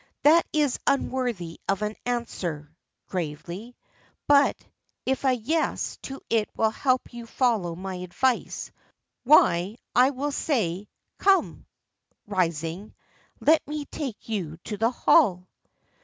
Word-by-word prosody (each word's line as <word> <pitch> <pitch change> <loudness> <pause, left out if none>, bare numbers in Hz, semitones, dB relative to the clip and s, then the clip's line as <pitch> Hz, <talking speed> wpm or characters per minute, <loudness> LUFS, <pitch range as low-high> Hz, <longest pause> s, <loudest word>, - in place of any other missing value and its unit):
"That 325 +3 +6
is 295 -5 +1
unworthy 245 -11 -1
of 195 +2 +1
an 210 +1 -2
answer," 170 -11 -3 0.3
gravely; 180 +7 -5 0.5
"but 285 -1 +5 0.5
if 265 +1 0
a 265 - +5
'yes' 280 +7 -1
to 270 0 -7
it 225 -2 +1
will 220 -1 +3
help 255 +1 0
you 235 -1 -8
to - - -21
follow 215 -10 +1
my 190 +2 -5
advice, 180 +8 -1 0.5
why, 200 - +5 0.2
I 250 +2 +6
will 285 +2 -3
say 240 - 0
it. 200 +3 -10 0.3
Come," 390 -1 +2 0.6
rising, 175 0 -2 0.5
"let 315 +1 +5
me 300 0 -4
take 270 -8 -6
you 180 -8 -3
to 210 - -4
the 225 +3 +2
hall." 185 -6 +3
225 Hz, 125 wpm, -26 LUFS, 180-265 Hz, 0.6 s, That